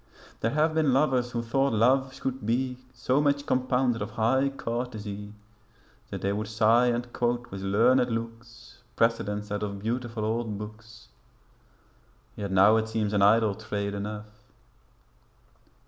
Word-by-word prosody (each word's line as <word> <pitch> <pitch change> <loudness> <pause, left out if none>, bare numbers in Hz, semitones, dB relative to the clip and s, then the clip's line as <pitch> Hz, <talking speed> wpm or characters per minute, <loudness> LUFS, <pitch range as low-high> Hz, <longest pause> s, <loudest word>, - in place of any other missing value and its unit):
There 115 - 0
have 155 +1 +2
been 155 -4 +2
lovers 130 -3 +2
who 120 -1 -3
thought 135 +2 +1
love 130 +4 +3
should 130 -2 -4
be 125 +3 -1
So 130 +3 0
much 145 -1 +1
compounded 125 -2 +1
of 105 - -3
high 125 +5 +1
courtesy 110 -5 -5 0.8
That - - -6
they 100 +1 0
would 105 +1 -3
sigh 110 +3 +3
and 120 0 -2
quote 120 0 -1
with 95 - -6
learned 120 +6 +3
looks 115 0 -7
Precedents 105 -2 0
out 105 - -2
of 100 -1 -3
beautiful 115 +1 -3
old 110 -1 -2
books; 105 +1 -11 1.3
Yet 100 -1 -4
now 100 +4 +6
it 110 0 -1
seems 110 -2 -1
an 100 - +2
idle 110 +1 +4
trade 100 -1 -4
enough.' 105 +1 -7
115 Hz, 145 wpm, -27 LUFS, 105-125 Hz, 1.3 s, now